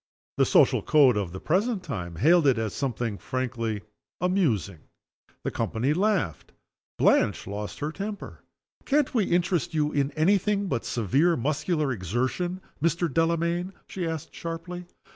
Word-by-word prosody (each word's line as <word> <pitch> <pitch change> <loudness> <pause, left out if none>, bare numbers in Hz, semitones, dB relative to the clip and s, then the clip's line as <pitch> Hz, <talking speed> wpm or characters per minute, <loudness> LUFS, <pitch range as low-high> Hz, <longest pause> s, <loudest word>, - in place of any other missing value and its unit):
The - - +4
social - - +4
code 140 -6 +5
of 100 -4 -2
the 95 - -7
present 195 - 0
time 85 - -5
hailed 155 - +4
it 130 -3 +4
as 110 -2 -2
something 120 -5 -2
frankly 115 -5 -3 0.4
amusing. 145 - 0 0.6
The - - -2
company 125 +6 0
laughed. 180 - 0 0.4
Blanche - - +3
lost 100 +1 -5
her 150 +1 -1
temper. 200 +3 -6 0.4
"Can't 290 -1 +1
we 220 -6 +2
interest 175 -2 0
you 150 -1 +1
in 140 -1 +1
any 185 +6 +3
thing 200 +1 0
but 130 -11 -2
severe 140 - +2
muscular 150 +3 0
exertion, 130 - -2 0.2
Mr. 170 -1 +1
Delamayn?" 170 +3 +1
she 180 -3 -3
asked, 160 -3 -5
sharply. 175 +2 -6
155 Hz, 145 wpm, -26 LUFS, 120-180 Hz, 0.6 s, code